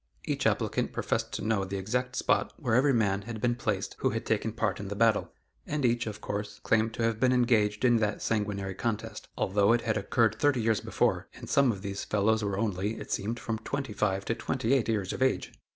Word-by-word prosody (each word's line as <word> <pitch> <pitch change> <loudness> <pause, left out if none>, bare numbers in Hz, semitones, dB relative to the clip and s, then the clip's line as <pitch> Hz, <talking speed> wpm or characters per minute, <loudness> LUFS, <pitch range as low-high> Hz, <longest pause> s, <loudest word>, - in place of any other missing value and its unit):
Each - - 0
applicant - - 0
professed - - -1
to - - -3
know 110 -3 +1
the 95 +1 -4
exact 125 +6 -2
spot - - +1
where 125 -8 -1
every 135 +4 +4
man 100 -5 +2
had 110 +2 -6
been 120 +2 +2
placed 105 -5 -2
who - - +2
had - - -3
taken - - 0
part - - -1
in 100 - -5
the 100 - -4
battle, 115 0 +2 0.4
and 145 -2 -1
each, 120 -1 +1
of 105 -1 -6
course, 105 0 -4
claimed 110 +1 +2
to 115 - -2
have 115 -1 +1
been 130 0 +4
engaged 115 -3 +2
in 120 -1 +5
that 105 -2 -1
sanguinary 100 -3 -1
contest, 110 +1 -4
although 100 +3 +3
it 120 - +2
had 110 -1 0
occurred 110 +2 +2
thirty 145 -3 +3
years 110 -2 +2
before, - - 0
and - - -10
some 140 -3 +4
of 100 -2 -7
these 100 -1 -4
fellows 110 +1 +1
were 100 -1 -1
only, 105 0 -1
it - - -8
seemed, 115 +4 -2
from 110 -1 -3
twenty 140 -4 -4
five 95 -2 0
to - - 0
twenty 130 +1 -1
eight 130 -4 +2
years 100 -4 0
of - - -6
age! 130 0 +1
110 Hz, 225 wpm, -29 LUFS, 100-120 Hz, 0.4 s, in